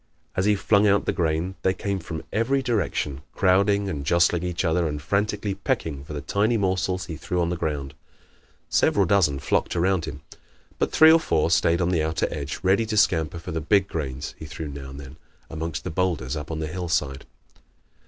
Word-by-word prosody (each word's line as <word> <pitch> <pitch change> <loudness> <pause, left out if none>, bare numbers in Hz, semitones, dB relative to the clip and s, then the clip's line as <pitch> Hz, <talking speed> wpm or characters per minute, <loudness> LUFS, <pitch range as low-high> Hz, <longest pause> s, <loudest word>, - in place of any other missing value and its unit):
As 95 - +1
he 105 0 +4
flung 100 +1 +3
out 100 0 +3
the - - 0
grain 85 +1 -1
they 95 0 +1
came 100 -1 -2
from 80 -2 -6
every 130 +5 +1
direction, 100 - -1
crowding 100 +2 +3
and 75 -7 -3
jostling 85 +2 +3
each 90 +1 -2
other 85 0 +2
and 75 -1 -3
frantically 100 +4 -1
pecking 75 -6 -2
for 75 - -9
the 75 - -4
tiny 105 - +1
morsels 95 -2 0
he 80 - -6
threw 85 +3 -3
on 85 0 +1
the - - -1
ground. 75 -4 -3 0.7
Several 100 - +3
dozen 85 -7 +3
flocked 70 - 0
around 90 0 +1
him. 75 -2 -7 0.6
But - - 0
three 160 0 +7
or 165 - +6
four 80 - +1
stayed 85 +1 +3
on 85 - +1
the 85 -3 +2
outer 80 +1 0
edge, 75 -1 -5
ready 95 +4 +3
to 110 0 -2
scamper 80 -5 +2
for 85 - -7
the 80 0 -2
big 95 +4 +3
grains 70 -5 -4
he - - -7
threw 80 0 -6
now 70 -1 -8
and 70 +1 -9
then 70 +1 -11 0.3
amongst 80 0 -4
the - - -4
boulders 80 -6 -1
up 75 0 -6
on 80 - -3
the 80 - -2
hillside. 75 -5 -2
85 Hz, 205 wpm, -24 LUFS, 75-100 Hz, 0.7 s, three